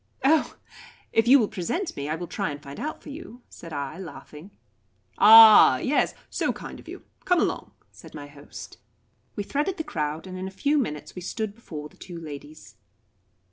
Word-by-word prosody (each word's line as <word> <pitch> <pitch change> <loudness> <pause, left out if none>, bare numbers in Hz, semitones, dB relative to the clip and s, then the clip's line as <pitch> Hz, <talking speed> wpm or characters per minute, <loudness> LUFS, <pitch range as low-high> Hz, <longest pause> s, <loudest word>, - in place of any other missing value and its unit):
"Oh, 305 +3 +2 0.6
if 225 +1 +3
you 270 +3 +8
will 225 -6 +2
present 240 - -3
me, 140 +1 -5
I 155 - -1
will 175 +2 -6
try 195 +1 -3
and 145 -1 -6
find 140 -1 -10
out 305 - -5
for - - -10
you," 275 -5 -10
said 165 - -12
I, 145 +3 -5
laughing. 160 0 -11 0.7
"Ah, 220 -10 +9
yes 280 - 0
so - - -1
kind - - -9
of - - -16
you - - -9 0.2
come 360 -1 +2
along," - - -1 0.2
said - - -14
my 145 -1 -8
host. 145 0 -12 0.6
We 205 - -3
threaded 295 - -2
the 320 - -3
crowd, 155 - -4
and 185 0 -8
in 190 - -4
a 190 - -11
few 290 +1 +2
minutes 150 - -4
we 180 - -8
stood 215 +3 -4
before 155 -9 -9
the - - -24
two 175 -2 -9
ladies. 150 -1 -11
185 Hz, 190 wpm, -25 LUFS, 150-245 Hz, 0.7 s, Ah